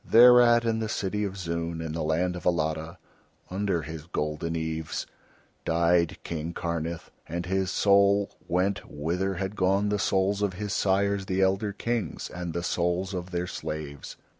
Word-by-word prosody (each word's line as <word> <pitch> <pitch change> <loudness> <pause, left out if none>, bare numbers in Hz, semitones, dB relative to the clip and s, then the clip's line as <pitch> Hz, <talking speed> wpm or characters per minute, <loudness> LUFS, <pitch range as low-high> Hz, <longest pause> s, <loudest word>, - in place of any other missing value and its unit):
Thereat 120 0 +7
in 115 -1 +1
the 110 -1 -2
city 105 0 -1
of 100 0 -5
Zoon 85 -2 -3
in 80 -1 -4
the 80 +1 -3
land 85 +4 0
of 90 - -7
Alatta, 80 0 0 0.5
under 95 -3 0
his 80 0 -7
golden 75 0 -2
eaves, 80 -1 -3 0.6
died 85 0 +2
King 80 0 -4
Karnith, 85 -1 -3 0.2
and 85 +2 -3
his 95 +1 0
soul 100 0 +4 0.2
went 95 +3 0
whither 90 +6 -1
had 95 +3 -3
gone 100 +2 +2
the 105 0 0
souls 95 +1 +1
of 100 -2 +1
his 100 +1 -4
sires 100 0 +1
the 95 -1 0
elder 95 +2 +2
Kings, 115 +1 -3
and 90 -1 -4
the 85 - -2
souls 90 +2 0
of 90 -1 -4
their 90 -1 -2
slaves. 75 -5 -6
90 Hz, 165 wpm, -27 LUFS, 85-100 Hz, 0.6 s, Thereat